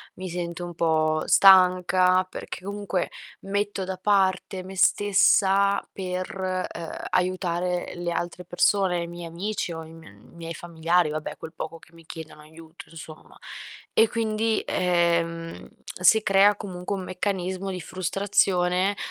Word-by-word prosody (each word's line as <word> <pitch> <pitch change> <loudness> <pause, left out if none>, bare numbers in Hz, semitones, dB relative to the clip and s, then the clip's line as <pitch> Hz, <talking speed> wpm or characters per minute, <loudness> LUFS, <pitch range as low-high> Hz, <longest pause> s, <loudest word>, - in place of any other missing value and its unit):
mi 185 0 -6
sento 175 0 -5
un 175 0 -6
po' 155 -1 +1
stanca, 185 -1 +5
perché 185 - -8
comunque 200 -2 -3 0.3
metto 200 0 -2
da 190 0 -5
parte 190 -1 +1
me 190 +1 -9
stessa 200 0 +3
per, 185 0 -3
ehm, 165 -1 -7 0.2
aiutare 180 -1 -1
le 175 0 -3
altre 175 +1 -4
persone, 180 0 +1
i - - -6
miei 175 0 -8
amici 175 +2 -4
o 160 0 -6
i 160 - -13
m 160 -10 -14
miei 165 +7 -9
familiari, 170 0 0
vabbè, 155 0 -5
quel 160 - -9
poco 165 +1 -6
che 165 - -21
mi 165 -1 -17
chiedono 160 -2 -10
aiuto, 160 +2 -14
insomma. 160 -1 -12 0.6
E 225 - +4
quindi, 220 -1 0
ehm, 170 -2 0 0.3
si 220 +5 +6
crea 200 +1 +5
comunque 185 -1 -5
un 190 - -5
meccanismo 185 0 -3
di 185 - -5
frustrazione, 185 +1 +1
180 Hz, 140 wpm, -25 LUFS, 170-195 Hz, 0.6 s, si